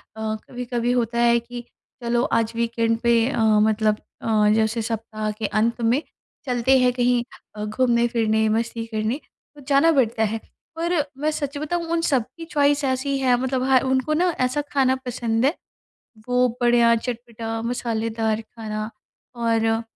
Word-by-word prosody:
अ, 220 Hz, 0 st, -2 dB
कभी-कभी 245 Hz, -1 st, -2 dB
होता 235 Hz, -1 st, 0 dB
है 235 Hz, 0 st, +4 dB
कि 240 Hz, +1 st, -8 dB, 0.4 s
चलो 240 Hz, 0 st, +1 dB, 0.2 s
आज 225 Hz, 0 st, -1 dB
वीकेंड 230 Hz, -1 st, 0 dB
पे 235 Hz, -1 st, +3 dB
अ, 245 Hz, -, -2 dB
मतलब 215 Hz, 0 st, +3 dB, 0.2 s
अ, 215 Hz, -2 st, +2 dB
जैसे 220 Hz, +1 st, +1 dB
सप्ताह 220 Hz, -1 st, -3 dB
के 215 Hz, +1 st, -5 dB
अंत 225 Hz, +4 st, 0 dB
में 235 Hz, +5 st, +2 dB, 0.4 s
चलते 250 Hz, +1 st, +3 dB
हैं 250 Hz, 0 st, +4 dB
कहीं 245 Hz, -1 st, +2 dB, 0.3 s
अ, 210 Hz, 0 st, -4 dB
घूमने-फिरने, 230 Hz, -1 st, +1 dB
मस्ती 225 Hz, +1 st, -1 dB
करने 220 Hz, +3 st, -2 dB, 0.4 s
तो 290 Hz, -, -13 dB
जाना 285 Hz, +3 st, +4 dB
पड़ता 235 Hz, -6 st, +2 dB
है। 220 Hz, +1 st, 0 dB, 0.4 s
पर, 335 Hz, -1 st, 0 dB
मैं 300 Hz, +3 st, 0 dB
सच 290 Hz, -2 st, -4 dB
बताऊँ 335 Hz, +4 st, -2 dB
उन 335 Hz, 0 st, +1 dB
सबकी 270 Hz, +1 st, -1 dB
चॉइस 290 Hz, -2 st, +2 dB
ऐसी 270 Hz, +1 st, 0 dB
है 255 Hz, -2 st, +3 dB
मतलब 260 Hz, 0 st, -1 dB
ह 260 Hz, -1 st, +6 dB
उनको 260 Hz, +3 st, +1 dB
ना 355 Hz, +4 st, +2 dB
ऐसा 255 Hz, +4 st, +1 dB
खाना 260 Hz, -2 st, +3 dB
पसंद 235 Hz, -1 st, 0 dB
है 285 Hz, -, +3 dB, 0.8 s
वो 250 Hz, 0 st, +3 dB
बढ़िया, 240 Hz, -1 st, +5 dB
चटपटा, 230 Hz, -1 st, -5 dB
मसालेदार 225 Hz, -2 st, -1 dB
खाना। 215 Hz, -1 st, -6 dB, 0.4 s
और 230 Hz, -1 st, +1 dB
अ, 225 Hz, 0 st, +1 dB
235 Hz, 155 wpm, -23 LUFS, 225-260 Hz, 0.8 s, ह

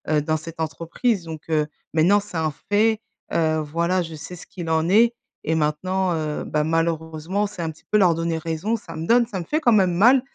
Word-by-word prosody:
heu, 150 Hz, -, +3 dB
dans 155 Hz, +1 st, 0 dB
cette 160 Hz, +1 st, -10 dB
entreprise 170 Hz, -, -1 dB
donc, 160 Hz, -2 st, -7 dB
heu, 155 Hz, -2 st, +2 dB, 0.3 s
maintenant, 170 Hz, +6 st, +4 dB
c'est 205 Hz, -2 st, -10 dB
un 160 Hz, -1 st, 0 dB, 0.2 s
fait. 220 Hz, +1 st, +3 dB, 0.3 s
Heu, 160 Hz, -1 st, +2 dB
voilà, 170 Hz, +4 st, 0 dB
je 165 Hz, -2 st, -6 dB
sais 160 Hz, +4 st, -8 dB
ce 175 Hz, -, -11 dB
qu'il 175 Hz, -3 st, -6 dB
en 160 Hz, +1 st, +1 dB
est 230 Hz, +5 st, +5 dB, 0.3 s
et 160 Hz, -, +1 dB
maintenant, 180 Hz, +5 st, 0 dB
heu, 155 Hz, -2 st, -2 dB
bah 150 Hz, 0 st, 0 dB
malheureusement, 165 Hz, +4 st, -1 dB
c'est 200 Hz, -3 st, -8 dB
un 165 Hz, -1 st, -2 dB
petit 155 Hz, -, -20 dB
peu 210 Hz, -, +4 dB
leur 185 Hz, -5 st, +5 dB
donner 165 Hz, 0 st, -1 dB
raison, 165 Hz, +7 st, -2 dB
ça 225 Hz, -, -9 dB
me 160 Hz, -, -4 dB
donne 235 Hz, 0 st, +4 dB
ça 200 Hz, -5 st, -4 dB
me 170 Hz, -, -5 dB
fait 310 Hz, -, 0 dB
quand 245 Hz, -, +4 dB
même 190 Hz, -5 st, +4 dB
mal, 240 Hz, +9 st, +5 dB
170 Hz, 225 wpm, -23 LUFS, 160-200 Hz, 0.3 s, est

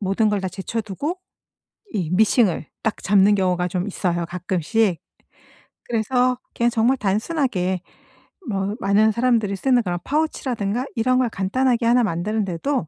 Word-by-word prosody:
모든 200 Hz, +2 st, +1 dB
걸 205 Hz, -1 st, 0 dB
다 190 Hz, -, -2 dB
제쳐두고 220 Hz, -, -4 dB, 0.8 s
이 180 Hz, -5 st, -2 dB
미싱을 200 Hz, -, +2 dB, 0.2 s
딱 220 Hz, -, -2 dB
잡는 200 Hz, +1 st, +5 dB
경우가 180 Hz, -2 st, +1 dB
좀 180 Hz, +2 st, -2 dB
있어요, 175 Hz, -3 st, -1 dB
가끔씩. 180 Hz, +2 st, 0 dB, 0.9 s
그래서 245 Hz, +2 st, +1 dB, 0.2 s
그냥 235 Hz, 0 st, +2 dB
정말 235 Hz, +3 st, +2 dB
단순하게 205 Hz, -, -1 dB, 0.7 s
뭐 195 Hz, 0 st, -1 dB
많은 210 Hz, +3 st, +4 dB
사람들이 230 Hz, -4 st, +1 dB
쓰는 250 Hz, +4 st, +2 dB
그런 175 Hz, -3 st, -2 dB
파우치라든가 255 Hz, -7 st, -1 dB
이런 255 Hz, +2 st, +2 dB
걸 250 Hz, -2 st, +2 dB
간단하게 235 Hz, +5 st, 0 dB
1 245 Hz, +1 st, +4 dB
만드는 210 Hz, +3 st, -1 dB
데도 185 Hz, -, -2 dB
210 Hz, 305 characters per minute, -22 LUFS, 190-245 Hz, 0.9 s, 잡는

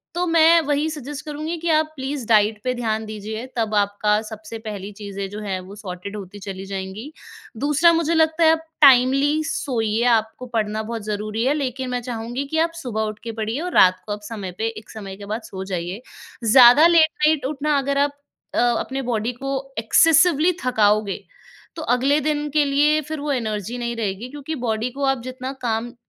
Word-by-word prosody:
तो 355 Hz, +1 st, 0 dB
मैं 330 Hz, 0 st, +5 dB
वही 295 Hz, +2 st, +1 dB
सजेस्ट 295 Hz, -2 st, -7 dB
करूँगी 310 Hz, +3 st, -4 dB
कि 335 Hz, +1 st, -3 dB
आप 310 Hz, 0 st, +3 dB
प्लीज़ 265 Hz, -2 st, -4 dB
डाइट 215 Hz, -1 st, +4 dB
पे 255 Hz, 0 st, 0 dB
ध्यान 220 Hz, -2 st, -1 dB
दीजिए। 215 Hz, +2 st, -6 dB
तब 220 Hz, -2 st, 0 dB
आपका 205 Hz, +1 st, +1 dB, 0.2 s
सबसे 220 Hz, 0 st, -8 dB
पहली 210 Hz, -2 st, -7 dB
चीज़ें 200 Hz, -1 st, -6 dB
जो 210 Hz, -, -6 dB
हैं, 195 Hz, -3 st, -3 dB
वो 190 Hz, +2 st, -11 dB
सॉर्टेड 200 Hz, 0 st, -7 dB
होती 200 Hz, 0 st, -9 dB
चली 195 Hz, -1 st, -6 dB
जाएँगी। 195 Hz, +7 st, -6 dB, 0.5 s
दूसरा 295 Hz, +4 st, +4 dB
मुझे 330 Hz, 0 st, +1 dB
लगता 320 Hz, +1 st, +3 dB
है, 320 Hz, -, +7 dB
आप 320 Hz, 0 st, 0 dB, 0.2 s
टाइमली 275 Hz, +3 st, +5 dB
सोइए 230 Hz, -7 st, -1 dB
आपको 220 Hz, +3 st, -3 dB
पढ़ना 215 Hz, 0 st, -1 dB
बहुत 225 Hz, +1 st, -5 dB
ज़रूरी 215 Hz, +2 st, -2 dB
है, 275 Hz, -, +3 dB
लेकिन 260 Hz, -3 st, -3 dB
मैं 245 Hz, 0 st, -2 dB
चाहूँगी 240 Hz, +4 st, -4 dB
कि 315 Hz, -, -3 dB
आप 330 Hz, -, -19 dB
सुबह 220 Hz, -3 st, -2 dB
उठ 210 Hz, -, -23 dB
के 230 Hz, -, -4 dB
पढ़िए 225 Hz, +6 st, -2 dB
और -, -, -10 dB
रात 185 Hz, 0 st, +6 dB
को 210 Hz, -, -6 dB
आप 210 Hz, -, -7 dB
समय 205 Hz, -5 st, -5 dB
पे 225 Hz, -, 0 dB
एक 215 Hz, 0 st, -11 dB
समय 200 Hz, -3 st, -8 dB
के 200 Hz, -, -9 dB
बाद 225 Hz, -, -3 dB
सो 190 Hz, 0 st, -5 dB
जाइए। 180 Hz, +5 st, -4 dB, 0.4 s
ज़्यादा 250 Hz, +7 st, +8 dB
लेट 325 Hz, -2 st, +5 dB, 0.2 s
नाइट 310 Hz, -3 st, +1 dB
उठना 295 Hz, +1 st, 0 dB
अगर 280 Hz, +1 st, -1 dB
आप 285 Hz, 0 st, -16 dB, 0.4 s
अ, -, -, -1 dB, 0.2 s
अपने 270 Hz, +1 st, -3 dB
बॉडी 230 Hz, -1 st, -1 dB
को 270 Hz, +3 st, -6 dB, 0.3 s
एक्सेसिवली 325 Hz, +7 st, +4 dB
थकाओगे, 215 Hz, -4 st, +2 dB, 0.5 s
तो 320 Hz, -, -6 dB
अगले 275 Hz, +4 st, +2 dB
दिन 295 Hz, 0 st, -1 dB
के 300 Hz, +1 st, +3 dB
लिए 295 Hz, +2 st, +3 dB
फिर 315 Hz, -, -4 dB
वो 290 Hz, 0 st, -2 dB
एनर्जी 220 Hz, -3 st, -3 dB
नहीं 235 Hz, -1 st, -3 dB
रहेगी 220 Hz, +1 st, -3 dB
क्योंकि 290 Hz, +3 st, -6 dB
बॉडी 225 Hz, +1 st, -1 dB
को 280 Hz, +3 st, -5 dB
आप 270 Hz, -2 st, +1 dB
जितना 255 Hz, +1 st, -6 dB
काम 235 Hz, 0 st, -2 dB
240 Hz, 195 wpm, -22 LUFS, 215-290 Hz, 0.5 s, ज़्यादा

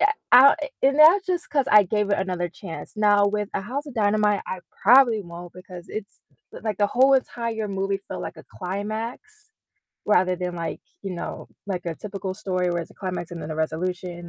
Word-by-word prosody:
yeah, 415 Hz, +3 st, +4 dB, 0.2 s
I 265 Hz, +3 st, +9 dB, 0.3 s
and 275 Hz, +2 st, +3 dB
that's 360 Hz, +6 st, +7 dB
just 355 Hz, -2 st, -2 dB
'cause 280 Hz, -2 st, +1 dB
I 210 Hz, -1 st, +8 dB
gave 210 Hz, +2 st, -1 dB
it -, -, +2 dB
another 180 Hz, -2 st, -2 dB
chance. 175 Hz, +3 st, -9 dB
Now, 205 Hz, -1 st, +4 dB
with 210 Hz, 0 st, -1 dB
A -, -, 0 dB
House 275 Hz, +8 st, -4 dB
of 285 Hz, -, -8 dB
Dynamite, 210 Hz, -1 st, +2 dB
I 185 Hz, -, -5 dB, 0.2 s
probably 235 Hz, -1 st, +6 dB
won't 175 Hz, 0 st, -10 dB
because 180 Hz, -1 st, -11 dB
it's 215 Hz, -2 st, -7 dB, 0.3 s
l -, -, -9 dB
like 215 Hz, -3 st, -2 dB
the 205 Hz, -, +3 dB
whole 265 Hz, +2 st, +4 dB
entire 230 Hz, -4 st, -2 dB
movie 195 Hz, 0 st, -2 dB
felt -, -, -5 dB
like -, -, -6 dB
a -, -, -12 dB
climax 225 Hz, -, -5 dB, 0.6 s
rather 185 Hz, -3 st, +3 dB
than, 180 Hz, -1 st, -4 dB
like, 165 Hz, -1 st, -4 dB, 0.2 s
you 195 Hz, -2 st, -4 dB
know, 170 Hz, -, -6 dB, 0.2 s
like 180 Hz, -3 st, -4 dB
a 170 Hz, -, -2 dB
typical 195 Hz, -2 st, -5 dB
story 185 Hz, -3 st, -1 dB
where 175 Hz, -1 st, -1 dB
it's -, -, -13 dB
a -, -, -25 dB
climax 180 Hz, -2 st, -4 dB
and 170 Hz, -, -6 dB
then 150 Hz, -, -6 dB
a 155 Hz, -, -6 dB
resolution 175 Hz, +2 st, -3 dB
200 Hz, 205 wpm, -24 LUFS, 180-230 Hz, 0.6 s, I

